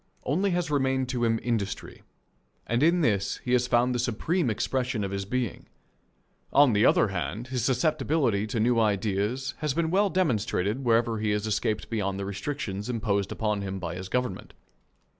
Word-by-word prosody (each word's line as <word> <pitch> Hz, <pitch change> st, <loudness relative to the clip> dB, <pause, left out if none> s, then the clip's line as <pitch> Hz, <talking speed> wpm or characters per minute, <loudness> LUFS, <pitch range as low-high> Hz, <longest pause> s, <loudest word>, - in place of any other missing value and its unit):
Only 185 Hz, +9 st, +1 dB
has 175 Hz, -3 st, -1 dB
remained 130 Hz, -2 st, +1 dB
to 125 Hz, -2 st, -1 dB
him 115 Hz, -1 st, +2 dB
industry, 105 Hz, -5 st, -3 dB, 0.6 s
and 120 Hz, +2 st, 0 dB
in 170 Hz, +3 st, +4 dB
this 100 Hz, -7 st, +1 dB
has 125 Hz, 0 st, +3 dB
he -, -, -8 dB
found 120 Hz, +1 st, +3 dB
the 125 Hz, -, -1 dB
supreme 130 Hz, -, 0 dB
expression 125 Hz, 0 st, -1 dB
of 100 Hz, -, -3 dB
his 100 Hz, 0 st, -3 dB
being. 125 Hz, +3 st, -3 dB, 0.8 s
On 140 Hz, -4 st, +5 dB
the 105 Hz, +1 st, +4 dB
other 110 Hz, -, +4 dB
hand, 105 Hz, +6 st, -4 dB
his 125 Hz, -3 st, -2 dB
susceptibility 130 Hz, -4 st, +1 dB
to 110 Hz, +1 st, -2 dB
new 115 Hz, +1 st, +3 dB
ideas 105 Hz, +5 st, 0 dB
has 150 Hz, -3 st, -1 dB
been 165 Hz, -1 st, 0 dB
well 200 Hz, +2 st, +3 dB
demonstrated 120 Hz, -, 0 dB
wherever 115 Hz, -2 st, +2 dB
he 110 Hz, 0 st, -1 dB
has 105 Hz, 0 st, 0 dB
escaped 110 Hz, +1 st, -1 dB
beyond 100 Hz, -3 st, -1 dB
the 100 Hz, -, -3 dB
restrictions 100 Hz, 0 st, -4 dB
imposed 105 Hz, -5 st, -1 dB
upon 105 Hz, -2 st, -1 dB
him 95 Hz, -1 st, -4 dB
by 85 Hz, -3 st, -4 dB
his 95 Hz, +1 st, -7 dB
government. 125 Hz, -6 st, -3 dB
115 Hz, 175 wpm, -27 LUFS, 105-130 Hz, 0.8 s, On